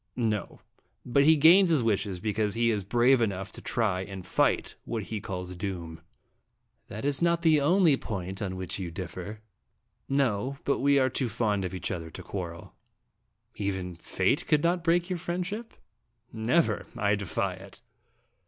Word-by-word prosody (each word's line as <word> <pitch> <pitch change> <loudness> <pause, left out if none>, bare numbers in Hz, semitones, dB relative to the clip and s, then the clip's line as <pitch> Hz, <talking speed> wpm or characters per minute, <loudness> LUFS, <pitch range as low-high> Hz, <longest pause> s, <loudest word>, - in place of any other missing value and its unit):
"No; 110 -4 -2 0.4
but 140 +3 +3
he 160 +1 +7
gains 170 +5 +7
his 155 -7 +3
wishes 100 -4 0
because 105 +1 -1
he 115 0 +2
is 105 -3 -1
brave 120 +5 +3
enough 95 -3 -1
to - - -9
try 100 -6 0
and 95 -1 -7
fight - - +1
what 115 -3 -3
he 105 0 -5
calls 90 -1 -5
doom." 85 -4 -5 0.4
" - - -48
That 110 +5 -6
is 145 +1 +1
not 170 0 +2
the 155 -3 +5
only 165 0 +4
point 95 -4 -5
on 95 -2 -3
which 95 +1 -4
you 90 -2 -4
differ." 95 +4 -7 0.4
" - - -48
No; 125 +3 -1
but 140 - +1
we 140 +1 +4
are 130 -2 +3
too 130 -2 -1
fond 105 -3 0
of 90 +1 -4
each 90 - -3
other 80 -2 -4
to - - -9
quarrel." 85 -3 -6 0.5
" - - -45
Even 95 -2 -3
Fate 95 - 0
could 150 -2 +3
not 170 0 +1
break 170 +1 +2
your 180 -2 -3
friend 175 +1 -2
ship?" 220 +5 -6 0.4
" - - -49 0.2
Never. 120 +10 +1
I 105 -2 +2
defy 100 -1 -1
it." 95 +1 -13
110 Hz, 180 wpm, -28 LUFS, 95-140 Hz, 0.5 s, he